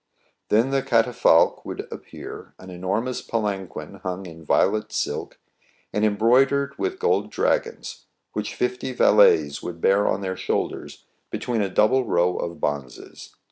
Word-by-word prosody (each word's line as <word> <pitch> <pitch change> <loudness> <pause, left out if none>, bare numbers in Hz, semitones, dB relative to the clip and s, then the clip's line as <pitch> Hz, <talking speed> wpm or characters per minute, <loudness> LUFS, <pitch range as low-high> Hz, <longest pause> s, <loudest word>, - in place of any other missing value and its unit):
Then 115 +5 +3
the 135 0 +2
catafalque 115 -9 +3
would - - -6
appear, - - -10
an 95 0 -11
enormous 100 +8 -2
palanquin 100 -6 -4
hung 95 +1 -4
in 80 -2 -11
violet 105 +7 +1
silk, - - -3 0.6
and 105 - 0
embroidered 125 +7 +3
with 380 -1 -2
gold 455 - +1
dragons, 470 -2 -2 0.3
which - - -4
fifty 380 0 -2
valets - - +4
would 85 -1 -6
bear 100 +4 +3
on 95 - 0
their 95 -1 -3
shoulders - - -3 0.2
between 120 -3 -2
a 100 - 0
double 120 +7 +3
row 90 +1 +2
of 85 -2 -4
bonzes. 70 -4 -5
105 Hz, 140 wpm, -24 LUFS, 95-135 Hz, 0.6 s, valets